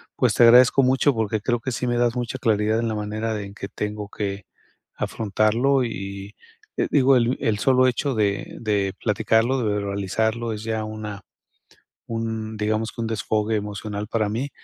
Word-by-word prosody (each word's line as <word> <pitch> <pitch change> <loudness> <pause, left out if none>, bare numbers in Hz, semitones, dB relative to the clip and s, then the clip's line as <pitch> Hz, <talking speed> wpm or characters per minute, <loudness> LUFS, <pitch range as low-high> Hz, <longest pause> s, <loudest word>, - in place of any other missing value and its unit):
pues, - - +2
te - - +4
agradezco 125 +3 +7
mucho 130 +2 +3
porque 110 -2 -1
creo 120 +2 0
que 130 +3 -4
sí 125 +2 -2
me 120 0 0
das 120 0 +2
mucha 125 +1 -3
claridad 110 -1 +1
en 115 - -1
la 110 - -2
manera 105 +1 -3
en 100 0 -8
que 100 - -7
tengo 105 0 -4
que 100 -2 -4 0.5
afrontarlo, 115 +6 +1
y 100 -3 -6 0.4
y, - - +2
eh, - - -1
digo, 135 -1 +5
el 120 +1 +1
el 105 -2 0
solo 130 +2 +4
hecho 130 +2 0
de 100 -2 -1
de 100 -4 0
platicarlo, 110 +4 +2
de 105 -3 0
verbalizarlo, 105 +3 -1
es 105 0 -7
ya 110 -1 -2
una 110 -1 -6 0.9
un, 115 -1 -3
digamos 110 +1 -1
que - - -8
un - - -1
desfogue 110 0 -1
emocional 105 0 -4
para 110 -2 0
mí 120 +7 -3
110 Hz, 180 wpm, -23 LUFS, 105-120 Hz, 0.9 s, agradezco